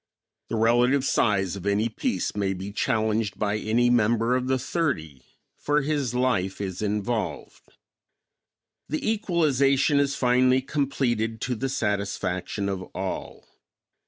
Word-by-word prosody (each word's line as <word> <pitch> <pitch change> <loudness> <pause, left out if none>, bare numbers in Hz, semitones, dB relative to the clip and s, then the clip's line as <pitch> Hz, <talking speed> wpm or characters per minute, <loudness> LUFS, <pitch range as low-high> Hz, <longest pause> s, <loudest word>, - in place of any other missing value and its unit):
The - - -2
relative 120 +4 +3
size 100 -8 +1
of 100 0 -6
any 100 +3 +2
piece 240 - -2
may 100 -2 0
be 95 +2 -6
challenged 110 -1 0
by 105 0 0
any 120 +3 +2
member 115 +1 +2
of 130 0 -1
the 130 0 +2
thirty, 120 - -2 0.4
for 145 0 +1
his 140 -5 -1
life 115 -7 0
is 95 -2 -4
involved. 105 - -3 1.1
The 155 - -2
equalization 150 - +2
is 140 -1 +1
finally 130 +1 +3
completed 120 -6 -1
to 125 - -1
the 135 +3 -2
satisfaction 100 -4 -2
of 95 -1 -2
all. 95 0 -5
115 Hz, 130 wpm, -25 LUFS, 100-135 Hz, 1.1 s, relative